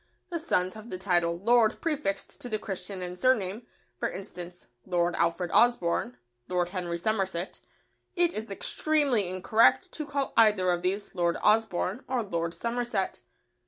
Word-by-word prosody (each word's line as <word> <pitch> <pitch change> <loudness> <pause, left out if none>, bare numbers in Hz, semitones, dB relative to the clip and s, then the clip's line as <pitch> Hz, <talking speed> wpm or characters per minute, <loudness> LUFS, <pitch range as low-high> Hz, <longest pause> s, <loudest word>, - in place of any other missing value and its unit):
The 340 - -1
sons 185 - 0
have 220 +2 -11
the 185 - -4
title 175 -3 +1
"Lord" 225 +3 +3
prefixed 295 -12 -2
to 245 - -6
the 215 - 0
Christian 190 -2 -6
and 180 0 -6
surname: 225 -4 +1 0.3
for - - 0
instance, 180 -2 -8 0.2
"Lord 175 +1 0
Alfred 170 +1 0
Osborne," 175 - +2 0.3
"Lord 180 -1 0
Henry 180 -2 -3
Somerset." 190 -2 -1 0.6
It 350 -1 +2
is 215 0 -4
extremely 255 - +1
incorrect 220 - +3
to 305 -2 -5
call 280 -1 -2
either 210 -5 +5
of 175 0 0
these 195 +3 -2
"Lord 170 -2 +1
Osborne" 215 +1 +2
or 255 -3 0
"Lord 170 -4 -3
Somerset." 235 - -2
195 Hz, 150 wpm, -28 LUFS, 180-235 Hz, 0.6 s, either